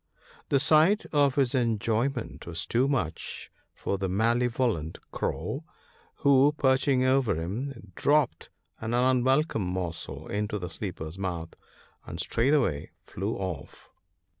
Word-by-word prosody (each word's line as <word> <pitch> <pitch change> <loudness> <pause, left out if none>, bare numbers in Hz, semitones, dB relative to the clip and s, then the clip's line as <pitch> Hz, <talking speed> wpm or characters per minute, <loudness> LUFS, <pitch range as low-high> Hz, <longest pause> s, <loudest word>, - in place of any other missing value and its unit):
The 140 - +4
sight 160 +8 +4
of 145 -3 +4
his 135 -4 +2
enjoy 115 0 +1
ment 125 -10 -7
was 85 0 -4
too 125 +3 +2
much 125 - -3 0.2
for 100 - -2
the 95 -1 -1
malevolent 115 -4 +1
Crow, - - -3 0.5
who, 140 +1 +4
perch 130 -1 +3
ing 130 -2 +3
over 130 -6 +3
him, 100 - -5
dropped 145 - +1 0.3
an 115 +1 -2
unwelcome 130 +1 +3
morsel 90 -3 -4
into 105 +1 -2
the 90 -3 -5
sleeper's 85 -2 -6
mouth, 85 -4 -3 0.5
and - - -8
straightway 120 - +1 0.2
flew 100 +5 -3
off. 90 -7 -6
115 Hz, 125 wpm, -28 LUFS, 95-135 Hz, 0.5 s, The